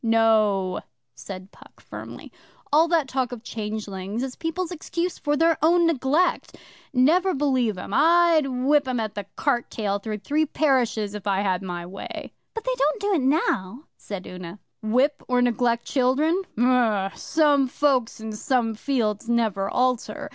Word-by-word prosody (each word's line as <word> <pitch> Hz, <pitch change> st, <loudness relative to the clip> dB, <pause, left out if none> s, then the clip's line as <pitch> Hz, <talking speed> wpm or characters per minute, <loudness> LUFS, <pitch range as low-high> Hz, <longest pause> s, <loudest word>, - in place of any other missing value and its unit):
'No,' 215 Hz, -4 st, +2 dB, 0.3 s
said 190 Hz, -, -9 dB
Puck -, -, -19 dB
firmly. -, -, -10 dB, 0.4 s
'All 320 Hz, +3 st, +5 dB
that 330 Hz, -4 st, +2 dB
talk 260 Hz, -2 st, -1 dB
of 240 Hz, -2 st, -8 dB
changelings 210 Hz, -1 st, -4 dB
is 265 Hz, -1 st, -5 dB
people's 330 Hz, +2 st, -3 dB
excuse 345 Hz, +1 st, -3 dB
for 295 Hz, -1 st, 0 dB
their 330 Hz, +1 st, +3 dB
own 340 Hz, +2 st, +4 dB
neglect. 310 Hz, +2 st, +1 dB, 0.3 s
Never 330 Hz, +9 st, +3 dB
believe 260 Hz, -7 st, +1 dB
'em. 190 Hz, -, -7 dB
I'd 330 Hz, +1 st, +4 dB
whip 270 Hz, +2 st, +2 dB
'em 250 Hz, -2 st, -1 dB
at 215 Hz, -2 st, -3 dB
the 205 Hz, -1 st, -5 dB
cart 250 Hz, -4 st, 0 dB
tail 205 Hz, -2 st, -2 dB
through 215 Hz, +1 st, -4 dB
three 300 Hz, +9 st, 0 dB
parishes 245 Hz, -9 st, +1 dB
if 210 Hz, -1 st, -7 dB
I 195 Hz, -1 st, +1 dB
had 190 Hz, -2 st, 0 dB
my 175 Hz, -2 st, -5 dB
way.' 185 Hz, +3 st, -8 dB, 0.2 s
'But 450 Hz, -, -4 dB
they -, -, 0 dB
don't -, -, +1 dB
do 410 Hz, 0 st, 0 dB
it 330 Hz, -, +2 dB
now,' 260 Hz, -, 0 dB
said 195 Hz, -3 st, -7 dB
Una. 180 Hz, +1 st, -8 dB, 0.2 s
'Whip, 255 Hz, +7 st, +1 dB
or 250 Hz, -1 st, +2 dB
neglect 240 Hz, -1 st, +1 dB
children? 290 Hz, +7 st, +2 dB, 0.2 s
Umm! 230 Hz, -5 st, +2 dB
Some 295 Hz, -4 st, +2 dB
folks 260 Hz, -4 st, +1 dB
and 220 Hz, 0 st, -6 dB
some 240 Hz, -1 st, 0 dB
fields 225 Hz, -2 st, -1 dB
never 220 Hz, -5 st, +1 dB
alter. 255 Hz, +4 st, -1 dB
250 Hz, 160 wpm, -24 LUFS, 210-295 Hz, 0.4 s, All